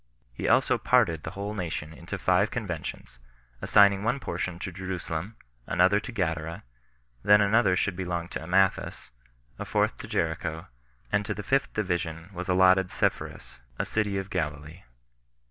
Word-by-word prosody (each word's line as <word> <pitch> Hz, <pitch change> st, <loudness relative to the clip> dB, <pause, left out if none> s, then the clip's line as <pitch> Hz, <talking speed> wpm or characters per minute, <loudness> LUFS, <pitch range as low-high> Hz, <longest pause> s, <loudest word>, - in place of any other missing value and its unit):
He -, -, -3 dB
also -, -, +3 dB
parted 80 Hz, -2 st, +3 dB
the -, -, -5 dB
whole 100 Hz, +1 st, -3 dB
nation 80 Hz, -5 st, -4 dB
into 70 Hz, -, -6 dB
five 95 Hz, +4 st, +2 dB
conventions, 90 Hz, -, -5 dB, 0.4 s
assigning 100 Hz, -1 st, +5 dB
one 115 Hz, +5 st, 0 dB
portion 90 Hz, -8 st, -3 dB
to 95 Hz, +2 st, -5 dB
Jerusalem, 95 Hz, +1 st, -5 dB, 0.3 s
another 95 Hz, +3 st, +4 dB
to 105 Hz, -, -7 dB
Gadara, 80 Hz, -6 st, -2 dB, 0.6 s
that 105 Hz, 0 st, +7 dB
another 105 Hz, -1 st, +4 dB
should 95 Hz, +1 st, 0 dB
belong 90 Hz, -2 st, -3 dB
to -, -, -5 dB
Amathus, 90 Hz, +3 st, +1 dB, 0.5 s
a -, -, -2 dB
fourth -, -, +1 dB
to -, -, -8 dB
Jericho, 80 Hz, 0 st, -2 dB, 0.5 s
and 105 Hz, -, +2 dB
to 105 Hz, -, -2 dB
the 105 Hz, -, -6 dB
fifth 135 Hz, +4 st, +1 dB
division 85 Hz, -3 st, -2 dB
was 90 Hz, +1 st, -5 dB
allotted 95 Hz, 0 st, +5 dB
Sepphoris, -, -, -2 dB, 0.2 s
a -, -, -1 dB
city 105 Hz, -2 st, -1 dB
of 95 Hz, 0 st, -5 dB
Galilee. 75 Hz, 0 st, -4 dB
90 Hz, 150 wpm, -27 LUFS, 80-100 Hz, 0.6 s, that